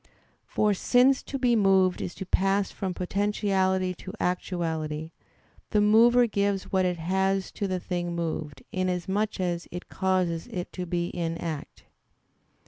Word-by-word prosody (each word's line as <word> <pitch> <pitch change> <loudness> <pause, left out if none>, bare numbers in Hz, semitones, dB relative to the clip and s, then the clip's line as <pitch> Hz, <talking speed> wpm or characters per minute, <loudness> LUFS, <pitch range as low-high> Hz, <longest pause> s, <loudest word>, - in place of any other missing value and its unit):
For, 210 -1 +2
since 250 +6 +4
to 275 - -5
be 245 -2 +3
moved 190 -3 +3
is 175 - -5
to 190 - -6
pass 195 +1 +1
from 185 -2 -4
potentiality 190 -1 0
to 185 +2 -9
actuality, 160 -3 -2 0.6
the 210 - +2
mover 230 +4 +6
gives 200 -3 -1
what 190 -1 +2
it 180 -1 0
has 190 +3 0
to 200 - -3
the 185 -1 -1
thing 175 -1 -3
moved, 160 -3 -4
inasmuch 185 +3 -1
as 175 -2 -2
it 175 +1 -8
causes 185 -3 0
it 180 -1 -5
to 180 -1 -5
be 175 0 -1
in 165 -1 -3
act. 160 -4 -6
185 Hz, 145 wpm, -27 LUFS, 175-200 Hz, 0.6 s, mover